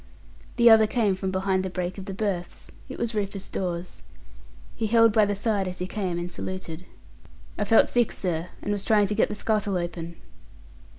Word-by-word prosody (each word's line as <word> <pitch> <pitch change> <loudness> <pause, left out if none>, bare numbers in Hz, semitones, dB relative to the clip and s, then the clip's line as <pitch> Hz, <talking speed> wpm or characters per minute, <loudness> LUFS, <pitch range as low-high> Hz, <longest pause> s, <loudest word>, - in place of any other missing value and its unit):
The 235 -1 +5
other 220 -1 +8
came 215 -3 +1
from 190 0 -3
behind 190 0 0
the 190 - -3
break 180 +1 -4
of 190 - -7
the 195 - -5
berths. 195 -4 -4 0.2
It - - -7
was 230 - -2
Rufus 200 -2 -3
Dawes. 175 -1 -4 0.7
He 220 - -1
held 230 0 +5
by 215 -1 +5
the 205 0 -1
side 200 -2 0
as 185 0 -5
he 180 - -3
came, 185 -3 -3
and 175 +1 -4
saluted. 180 -2 -6 0.7
"I 210 - -1
felt 225 +2 +5
sick, 240 -2 +1
sir, 175 -2 -3
and 205 - -2
was 205 -1 -2
trying 210 -2 +4
to 205 - -2
get 220 - +2
the - - -4
scuttle 210 -2 0
open." 170 -1 -5
195 Hz, 195 wpm, -26 LUFS, 180-215 Hz, 0.7 s, other